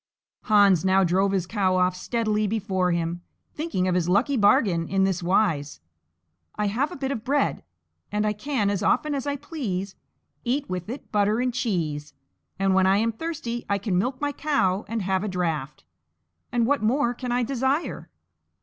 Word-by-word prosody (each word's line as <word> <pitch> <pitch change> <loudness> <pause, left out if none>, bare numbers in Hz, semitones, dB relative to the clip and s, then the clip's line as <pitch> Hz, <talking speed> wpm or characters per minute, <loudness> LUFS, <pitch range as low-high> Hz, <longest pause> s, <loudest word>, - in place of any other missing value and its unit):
Hans 200 -5 +5
now 190 0 +4
drove 190 +3 +2
his 190 -3 0
cow 190 -1 +1
off 180 0 +2
steadily 215 +1 0
before 190 -4 0
him, 170 0 -2 0.3
thinking 300 - -1
of 185 - +1
his 175 -1 +1
lucky 225 +10 +2
bargain 200 -6 +3
in 195 0 +1
this 190 -2 0
wise: 170 -6 +1 0.8
"I 210 - -1
have 240 +9 0
a - - -6
bit 270 -1 -3
of 225 -5 -4
bread, 280 +3 0 0.5
and 210 +1 0
I 210 - +1
can, 210 -2 -1
as 200 - -1
often 300 -1 +1
as 280 0 -3
I 285 - 0
please, 220 - -4 0.5
eat 270 +4 -1
with 185 +1 -4
it 260 +5 -7
butter 210 +1 +2
and 250 0 0
cheese, 155 - -2 0.4
and 195 0 +2
when 190 0 +4
I 195 +1 +4
am 225 +2 +1
thirsty 240 -3 -4
I 200 - +2
can 200 -1 -2
milk 255 +8 0
my 290 0 -1
cow 215 -11 0
and 225 -1 -2
have 190 +1 0
a - - -2
draught: 165 -7 -3 0.7
and 240 -2 +2
what 285 0 +1
more 240 +2 +2
can 245 0 -5
I 245 0 +1
desire?" 265 +5 -1
205 Hz, 185 wpm, -25 LUFS, 185-245 Hz, 0.8 s, Hans